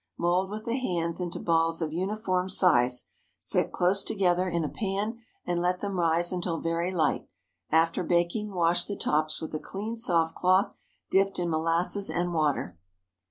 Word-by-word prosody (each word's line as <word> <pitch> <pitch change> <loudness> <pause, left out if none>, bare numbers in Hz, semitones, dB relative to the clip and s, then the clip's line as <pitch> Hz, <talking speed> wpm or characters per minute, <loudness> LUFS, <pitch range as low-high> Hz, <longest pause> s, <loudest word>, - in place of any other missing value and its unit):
Mould 180 +2 +1
with 215 +1 -6
the 235 - -1
hands 170 -7 -2
into 175 -1 -4
balls 165 -1 +1
of 160 -2 -2
uniform 185 0 -1
size, 125 -10 +3 0.3
set - - 0
close 185 +2 +2
together 185 -2 +1
in 170 -1 -1
a - - -1
pan, 205 +5 -3 0.3
and 175 -1 -1
let 180 +1 0
them 200 -3 -3
rise 170 +1 +2
until 175 -2 -2
very 165 +2 -1
light. 165 -4 0 0.4
After 165 +2 +2
baking, 175 +5 0
wash 175 -1 +1
the 200 - -4
tops 155 -2 0
with 160 - -7
a 155 - -2
clean 210 +7 -5
soft 170 -8 +2
cloth 185 +2 +2 0.4
dipped 195 0 +2
in 175 -1 -1
molasses 165 +5 +1
and 175 0 -1
water. 145 - -1
175 Hz, 165 wpm, -28 LUFS, 165-190 Hz, 0.4 s, size